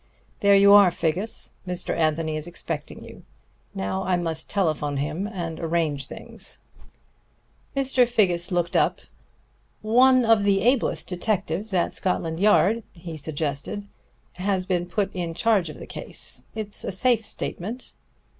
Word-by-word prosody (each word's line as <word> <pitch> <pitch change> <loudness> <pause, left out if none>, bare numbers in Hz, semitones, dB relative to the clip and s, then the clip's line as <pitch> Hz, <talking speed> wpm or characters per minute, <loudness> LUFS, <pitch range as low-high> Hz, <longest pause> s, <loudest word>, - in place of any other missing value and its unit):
There 200 0 +5
you 200 0 +7
are, 205 -2 +8
Figgis. 175 +5 -1 0.2
Mr. 180 -1 -2
Anthony 155 0 0
is 155 +2 -4
expecting 165 -3 -6
you. - - -12 0.5
Now 95 0 -2
I 180 -1 +1
must 165 -2 -3
telephone 155 -7 0
him 155 +8 -2
and 170 -6 -5
arrange 160 -4 -1
things." - - -5 1.2
Mr. 265 -2 +3
Figgis 185 -8 +1
looked 175 -1 0
up. - - +2 0.8
"One 250 +3 +5
of 225 -2 +4
the 200 -1 +3
ablest 245 +3 +1
detectives 195 +1 -2
at 180 -3 +1
Scotland 165 -3 -1
Yard," 210 +2 +4
he 170 -2 -8
suggested, 155 +5 -4 0.5
"has 190 0 0
been 175 -2 -1
put 200 +2 -1
in 170 -3 -4
charge 205 -5 +2
of 155 - -9
the - - -9
case. 125 - -3
It's 215 -2 -3
a - - -3
safe 225 +4 +2
statement." 215 +3 -4
180 Hz, 140 wpm, -24 LUFS, 160-205 Hz, 1.2 s, are